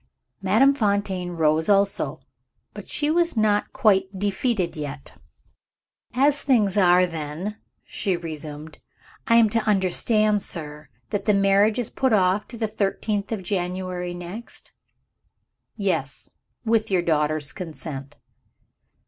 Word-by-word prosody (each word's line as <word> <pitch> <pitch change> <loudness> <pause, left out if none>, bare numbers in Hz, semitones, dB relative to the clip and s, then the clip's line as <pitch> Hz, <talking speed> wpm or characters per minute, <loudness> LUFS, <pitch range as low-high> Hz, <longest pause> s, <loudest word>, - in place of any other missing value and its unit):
Madame 225 +9 +4
Fontaine 200 -6 -1
rose 160 +1 +1
also 200 0 +2 0.5
but - - -10
she 295 +1 0
was 340 -4 +1
not 210 -1 +2
quite 195 -2 +2
defeated 200 -1 -1
yet. 145 -2 -6 1.0
"As 280 +2 +3
things 215 -8 +2
are, 180 -2 +5
then," 165 +5 -5 0.3
she 190 -3 -1
resumed, 155 -2 -7 0.5
"I 230 - +4
am 230 -1 +6
to 230 - +2
understand, 210 +2 +2
sir, 150 -4 -7 0.2
that 205 -2 -2
the 210 - +3
marriage 200 +2 +3
is 245 -3 -2
put 260 -3 +1
off 190 0 +2
to 235 - -10
the 220 -1 -1
thirteenth 210 0 -2
of 210 -4 -3
January 180 -1 -3
next?" 180 +7 -9 1.0
"Yes, 190 -10 -2 0.3
with 225 -1 +1
your 185 -3 +1
daughter's 155 -2 0
consent." 150 -6 -7
195 Hz, 125 wpm, -24 LUFS, 170-215 Hz, 1.0 s, am